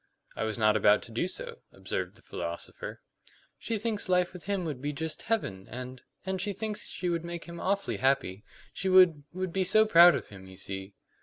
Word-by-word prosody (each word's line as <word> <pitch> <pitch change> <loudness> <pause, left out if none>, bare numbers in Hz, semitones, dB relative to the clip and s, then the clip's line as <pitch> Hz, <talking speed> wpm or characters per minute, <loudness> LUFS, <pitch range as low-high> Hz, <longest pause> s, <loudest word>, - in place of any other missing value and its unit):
"I 110 - -2
was 110 -1 -2
not 110 -1 +4
about 105 0 +4
to - - -11
do 120 +10 -1
so," 470 - -8
observed - - -4
the - - -15
philosopher. - - -6 0.6
"She 230 - -2
thinks 210 -2 -1
life 180 0 +2
with 180 - -10
him 200 -3 -1
would 145 -6 -4
be 145 +1 -2
just 160 +2 -4
heaven; 100 - -2
and 125 +1 -7 0.2
and 190 -1 -2
she 205 +1 -1
thinks 215 +1 -3
she 180 - -3
would 170 -1 0
make 170 0 -5
him 170 0 -8
awfully 195 +1 -1
happy. 120 -7 +1 0.3
She 190 - -2
would 180 -5 +6
would 185 -1 -4
be 190 - +2
so 215 +4 +5
proud 175 -4 +8
of - - -5
him, 95 -2 -12
you 95 0 -13
see." 95 +1 -6
170 Hz, 210 wpm, -29 LUFS, 120-190 Hz, 0.6 s, proud